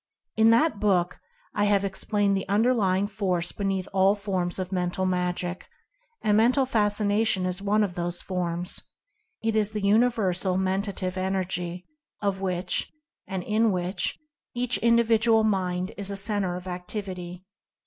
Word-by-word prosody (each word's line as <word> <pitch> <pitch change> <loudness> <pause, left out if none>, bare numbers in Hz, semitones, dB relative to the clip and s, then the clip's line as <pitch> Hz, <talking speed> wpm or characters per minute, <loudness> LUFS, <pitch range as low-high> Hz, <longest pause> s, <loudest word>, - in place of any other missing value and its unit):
In 220 0 +5
that 230 0 +3
book 180 -4 +1 0.3
I 205 -1 +1
have 200 -1 +2
explained 200 +1 0
that 195 - -3
the - - -5
Underlying 205 -3 +2
Force 185 -4 -1
beneath 195 -2 -2
all 195 +1 +4
forms 190 -4 -2
of 185 0 -4
Mental 180 0 -1
Magic 180 -1 -2 0.2
— - - -44
and 210 -1 +3
Mental 250 +5 +4
Fascination 210 -3 +1
is 185 +1 -2
one 210 +2 +2
of 195 -4 -2
those 175 -1 -3
forms 175 -1 -2 0.3
— 435 - -45
is 220 -2 +1
the 210 -1 -4
Universal 200 -4 +2
Mentative 190 -1 -1
Energy, 185 -2 -2 0.3
of 200 -2 -1
which, 185 -1 -1 0.4
and 190 -2 -3
in 220 +2 +2
which, 180 +1 -2 0.4
each 245 0 +1
Individual 230 -1 +4
Mind 185 -2 0
is 200 -1 -2
a 200 - -2
Cen 205 +1 0
ter 180 -2 -1
of 180 0 -7
Activity. 180 -1 -6
195 Hz, 150 wpm, -26 LUFS, 180-215 Hz, 0.4 s, In